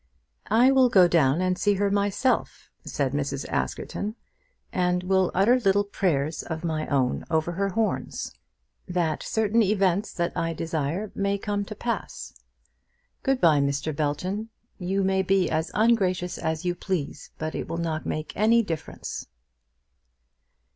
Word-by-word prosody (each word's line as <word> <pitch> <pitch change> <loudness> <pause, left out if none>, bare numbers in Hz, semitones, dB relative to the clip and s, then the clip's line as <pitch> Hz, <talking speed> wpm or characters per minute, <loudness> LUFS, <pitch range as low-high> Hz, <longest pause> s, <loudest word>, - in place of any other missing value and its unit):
"I 240 +5 +5
will 260 -2 +5
go 185 -5 +6
down 160 -2 +3
and 185 0 +1
see 205 - +3
to - - -5
her 200 -1 +2
myself," 205 +5 0
said 140 -3 -2
Mrs. 140 -1 -2
Askerton, 210 +2 -3 0.6
"and 180 0 +1
will 190 0 +2
utter 225 +7 +4
little 200 -3 +3
prayers 160 -7 -1
of 160 0 -5
my 155 -2 -2
own 130 -3 +1
over 160 +1 +1
her 195 +3 -1
horns, 220 +3 -2 0.5
that 175 -3 -1
certain 220 +1 +1
events 195 -1 +2
that 170 -2 -2
I 165 0 -1
desire 165 +5 -2
may 200 0 0
come 205 0 -2
to 215 - -7
pass. 230 -1 -4 0.9
Good 270 -1 +1
bye, 155 - +5
Mr. 140 +2 -1
Belton. 180 +9 -2 0.3
You 190 +2 0
may 190 0 +2
be 190 -1 +2
as 160 0 0
ungracious 185 -5 +2
as 160 +2 -2
you 175 - +1
please, 175 -5 -4
but 155 0 -4
it - - -4
will 165 - -4
not 160 -2 -2
make 155 0 -4
any 230 +3 +4
difference." 165 -6 -5
185 Hz, 150 wpm, -26 LUFS, 160-205 Hz, 0.9 s, go